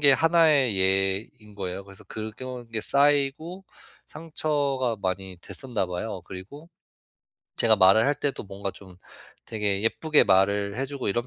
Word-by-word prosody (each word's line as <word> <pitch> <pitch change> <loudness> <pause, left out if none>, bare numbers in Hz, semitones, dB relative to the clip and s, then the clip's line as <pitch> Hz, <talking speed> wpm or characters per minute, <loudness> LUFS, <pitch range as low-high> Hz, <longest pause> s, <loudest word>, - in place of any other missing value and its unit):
게 145 -1 +6
하나의 150 - +4
예인 95 +3 0
거예요. 95 0 -5
그래서 95 -1 -14
그런 120 +3 -7
게 110 - -2
쌓이고 145 - +1 0.4
상처가 145 -6 -2
많이 95 0 -3
됐었나 120 -4 -4
봐요. 90 +2 -5
그리고 105 - -10 0.9
제가 - - +4
말을 95 +4 +6
할 145 0 +1
때도 145 - -3
뭔가 100 0 -6
좀 95 -3 -15 0.5
되게 105 -3 -1
예쁘게 150 +7 +3
말을 100 +2 +2
해 135 - -1
주고 140 -1 -6
이런 120 +4 -1
110 Hz, 280 characters per minute, -26 LUFS, 95-140 Hz, 0.9 s, 게